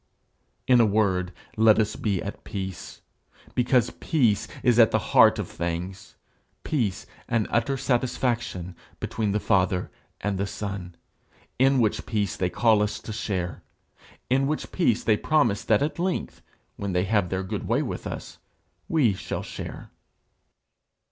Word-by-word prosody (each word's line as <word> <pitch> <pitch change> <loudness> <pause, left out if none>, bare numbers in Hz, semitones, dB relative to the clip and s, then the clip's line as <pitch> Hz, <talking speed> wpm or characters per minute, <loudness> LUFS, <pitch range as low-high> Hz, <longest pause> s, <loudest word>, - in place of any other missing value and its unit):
"' - - -46
In 120 - +7
a - - +5
word, 95 -4 +1 0.3
let 110 -1 +6
us 110 -1 +1
be 100 -5 -1
at 100 - -7
peace, 95 -3 -6 0.5
because 125 -1 +2
peace 110 -8 +1 0.2
is 120 -2 +4
at 115 - +8
the - - +2 0.2
heart - - +7
of - - -3
things 85 +3 -5 0.5
peace 110 -9 -1 0.2
and 115 -3 +1
utter 120 +4 +1
satisfaction 120 -8 -1 0.2
between 110 -2 -2
the 105 - +1
Father 95 -2 +1 0.3
and 100 -1 -2
the 100 - 0
Son 100 -4 -5 0.6
in 135 +1 +5
which 110 -3 0
peace 105 -5 -1
they 90 - 0
call 110 +1 +3
us 105 0 -1
to 110 - -7
share; 95 -5 -3 0.7
in 135 +2 +2
which 155 +1 -3
peace 120 - +1
they 110 -2 +3
promise 125 -10 +2
that 110 +3 +3
at 155 +3 -3
length, 180 +1 -2 0.4
when 100 -2 -3
they 90 0 +2
have 100 -2 +1
their 95 +1 -2
good 95 - -4
way - - +2
with - - -5
us, - - -7 0.5
we 135 -10 +3
shall 95 - -5
share. - - -8
105 Hz, 155 wpm, -26 LUFS, 95-120 Hz, 0.7 s, at